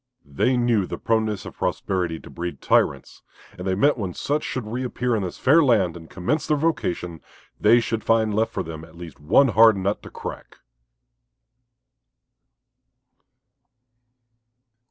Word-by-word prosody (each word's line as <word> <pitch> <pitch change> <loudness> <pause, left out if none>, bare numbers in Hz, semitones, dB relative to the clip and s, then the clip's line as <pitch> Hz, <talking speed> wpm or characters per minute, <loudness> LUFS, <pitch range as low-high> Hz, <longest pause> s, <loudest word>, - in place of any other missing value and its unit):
They 75 - 0
knew 120 -6 +1
the - - -5
proneness 110 -3 -1
of - - -10
prosperity 90 -4 -2
to - - -13
breed 85 0 -5
tyrants, - - 0 0.3
and 90 +1 -7
they 95 - +1
meant 140 +6 +2
when 95 -4 -4
such 150 +2 -1
should 130 -4 -4
reappear 125 +1 -2
in 110 - -1
this 90 -2 -5
fair 155 +5 +4
land 100 - +2
and 80 -1 -11
commence 135 - -2
their 150 - +2
vocation, 100 - -2 0.4
they 115 +3 +5
should 115 -1 -3
find 110 -1 +2
left 110 +2 0
for 95 - -3
them 80 -1 -8
at 80 - -15
least 85 -2 -10
one 105 - +4
hard 110 -1 +6
nut 95 +2 -1
to - - -11
crack. - - -9
110 Hz, 150 wpm, -23 LUFS, 90-120 Hz, 0.4 s, hard